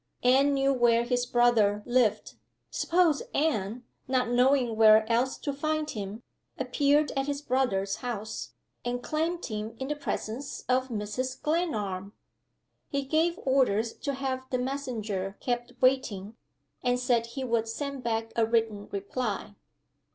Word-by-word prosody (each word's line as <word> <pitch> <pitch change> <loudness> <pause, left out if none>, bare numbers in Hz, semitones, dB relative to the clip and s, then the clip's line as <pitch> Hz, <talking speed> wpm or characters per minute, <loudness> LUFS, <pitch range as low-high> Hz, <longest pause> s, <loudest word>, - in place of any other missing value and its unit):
Anne 265 +3 +5
knew 275 0 +3
where 235 -2 +4
his 245 0 0
brother 225 -4 +3
lived. 240 -3 +1 0.4
Suppose 335 -4 +2
Anne 240 -6 0 0.2
(not 255 -2 +1
knowing 250 -1 +3
where 220 0 +6
else 245 +3 +1
to 285 - -3
find 310 +2 -1
him) 210 +2 -6 0.3
appeared 285 +3 +2
at 270 0 -1
his 285 0 -3
brother's 200 -8 0
house, 220 -3 -5 0.3
and 245 0 -3
claimed 330 +3 -1
him 215 0 -5
in 265 +2 -4
the 300 - 0
presence 270 -1 -4
of 255 +1 +2
Mrs. 250 +3 -3
Glenarm? 215 - -1 0.8
He 280 -1 -1
gave 320 +5 +1
orders 235 -5 +2
to 280 -1 -4
have 260 -1 -3
the 255 - 0
messenger 225 -7 -3
kept 245 0 -2
waiting, 230 -6 +1 0.5
and 245 0 +1
said 240 -2 +1
he 260 +3 -5
would 230 -2 0
send 280 +4 -4
back 225 -1 -2
a 230 - +3
written 220 -2 0
reply. 205 +1 -3
245 Hz, 140 wpm, -28 LUFS, 220-275 Hz, 0.8 s, where